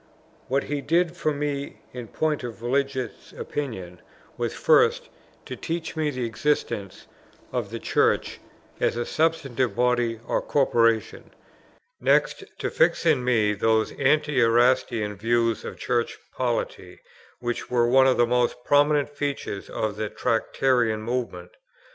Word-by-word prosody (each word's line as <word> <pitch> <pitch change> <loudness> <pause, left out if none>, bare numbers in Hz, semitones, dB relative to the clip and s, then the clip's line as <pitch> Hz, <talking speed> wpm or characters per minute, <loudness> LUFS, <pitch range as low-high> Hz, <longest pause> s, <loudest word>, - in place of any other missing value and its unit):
What 135 +2 +1
he 145 0 -3
did 170 +4 +1
for 155 - 0
me 145 -1 -3 0.2
in 125 -2 -7
point 155 +1 -1
of 115 -1 -7
religious 135 +1 -2
opinion, 95 -11 -5 0.3
was, 120 -1 -2
first, 480 0 +3 0.4
to - - -6
teach 165 -1 -4
me 155 -1 0
the 130 -4 -3
existence 115 -4 -2 0.5
of - - -2
the - - -5
Church, - - +1 0.4
as - - +1
a 120 - -1
substantive 135 -8 0
body 120 -2 +1
or - - 0
corporation; 115 -5 +1 0.7
next - - +2
to - - -3
fix - - +2
in 125 - +3
me 110 -4 +2
those 110 +2 +1
anti 150 -1 +2
Erastian 115 -2 +2
views 115 +1 +1
of - - -7
Church 120 -2 -1 0.2
polity, - - -3 0.4
which 120 -1 -4
were 120 -1 +3
one 130 +2 +5
of 130 - +3
the 120 - +5
most 125 0 +1
prominent 145 0 +3
features 145 -8 -4
of 105 -1 -3
the 110 -1 -2
Tractarian 115 -1 0
movement. 110 -7 -4
125 Hz, 135 wpm, -25 LUFS, 115-145 Hz, 0.7 s, one